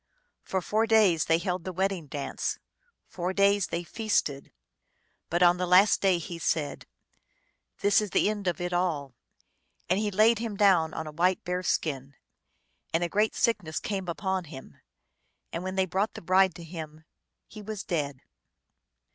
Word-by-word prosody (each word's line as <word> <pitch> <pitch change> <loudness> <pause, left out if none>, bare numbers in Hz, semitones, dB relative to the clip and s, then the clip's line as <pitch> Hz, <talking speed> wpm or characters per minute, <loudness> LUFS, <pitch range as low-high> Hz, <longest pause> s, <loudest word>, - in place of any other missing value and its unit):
For 190 -1 -3
four 220 +4 +1
days 210 -8 +4
they 165 - +3
held 180 0 -3
the 185 - -4
wedding 190 -3 -2
dance; 140 0 -3 0.5
four 180 +1 -4
days 200 -1 +3
they 170 +1 -3
feasted. 170 -8 -1 0.8
But 175 +1 +2
on 175 0 +5
the 180 0 -2
last 185 +4 +5
day 190 -2 +3
he 170 0 -7
said, 150 -3 -2 0.9
"This 205 +1 +4
is 210 - -3
the - - +2
end 205 -2 -2
of 175 -3 0
it 175 0 -3
all," 160 -7 -1 0.7
and 185 +3 +2
he 210 -1 0
laid 215 +3 +4
him 225 -3 -4
down 185 -6 +4
on 160 - -4
a 155 - -7
white 180 +4 +1
bear 180 0 -2
skin, 140 -6 -2 0.8
and 165 +2 +1
a 175 - -1
great 210 +3 +1
sickness 180 -9 0
came 195 -3 -4
upon 190 +1 -2
him, 140 -4 -12 0.7
and 170 - -3
when 185 0 -4
they 190 -1 +2
brought 190 +4 -1
the - - -7
bride 185 0 +3
to 170 - -9
him 160 -2 -8 0.4
he 215 - -11
was 210 -1 -6
dead. 145 -6 -3
180 Hz, 170 wpm, -28 LUFS, 165-200 Hz, 0.9 s, on